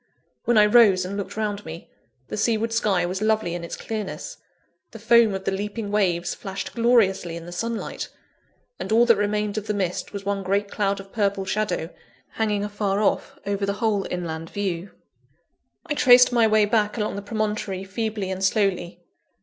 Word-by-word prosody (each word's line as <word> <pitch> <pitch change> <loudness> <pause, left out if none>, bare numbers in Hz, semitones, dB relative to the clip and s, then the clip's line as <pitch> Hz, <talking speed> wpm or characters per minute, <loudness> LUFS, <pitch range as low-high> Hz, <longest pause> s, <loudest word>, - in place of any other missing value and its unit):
When 240 -1 +3
I 210 - +7
rose 210 -4 +5
and 195 +2 -5
looked 200 +1 -5
around 210 -1 -2
me, 160 +1 -9 0.4
the - - -5
seaward 225 +1 0
sky 200 -6 +2
was 185 +3 -3
lovely 215 -5 +1
in 175 -1 -5
its 170 - -5
clearness; 220 - -5 0.5
the - - -10
foam 225 -1 +4
of 190 - -5
the - - -1
leaping 205 +2 -4
waves 180 -4 +1
flashed 195 -1 -6
gloriously 210 -8 +2
in 165 - -9
the 175 - -9
sunlight: 230 +6 -4 0.7
and - - -5
all 230 +2 +5
that 230 -1 +6
remained 210 +1 -1
of 210 - -12
the 210 - -1
mist 185 -3 -2
was 200 -1 -7
one 200 0 -1
great 200 +2 -1
cloud 200 -1 0
of 195 0 -11
purple 200 -2 0
shadow, 190 -4 -2 0.4
hanging 210 -2 -1
afar 205 -1 -1
off 210 - 0
over 200 0 -2
the 200 0 +1
whole 210 -3 0
inland 165 -2 -4
view. 195 -2 -3 1.0
I 315 - -2
traced 250 -3 +6
my 235 -2 +4
way 215 -1 +4
back 210 +1 +1
along 210 -2 -2
the 200 - -4
promontory 210 -2 -2
feebly 205 -1 -3
and 190 0 -4
slowly. 195 -3 0
205 Hz, 180 wpm, -24 LUFS, 190-215 Hz, 1.0 s, I